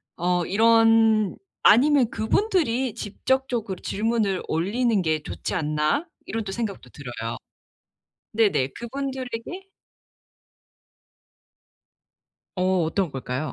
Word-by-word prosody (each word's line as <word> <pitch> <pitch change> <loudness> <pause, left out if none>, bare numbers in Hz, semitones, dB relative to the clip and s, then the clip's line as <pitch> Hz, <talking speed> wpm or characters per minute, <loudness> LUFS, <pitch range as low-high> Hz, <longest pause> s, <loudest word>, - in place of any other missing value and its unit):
어 175 0 0
이런 225 0 +4 0.3
‘아니면 265 +1 +5
그분들이 260 - 0
직접적으로 230 -2 -2
질문을 210 -3 0
올리는 210 +7 +1
게 155 -2 0
좋지 - - -5
않나.‘ 155 - 0 0.2
이런 225 0 -3
또 195 - -6
생각도 200 - -5
들어요. 125 -2 -6 0.9
네네 205 - +2
그분들에게 260 +5 -5 2.9
어. 185 -1 +1
어떤 170 +1 -1
걸까요? 130 +1 -4
220 Hz, 215 characters per minute, -24 LUFS, 180-240 Hz, 2.9 s, 아니면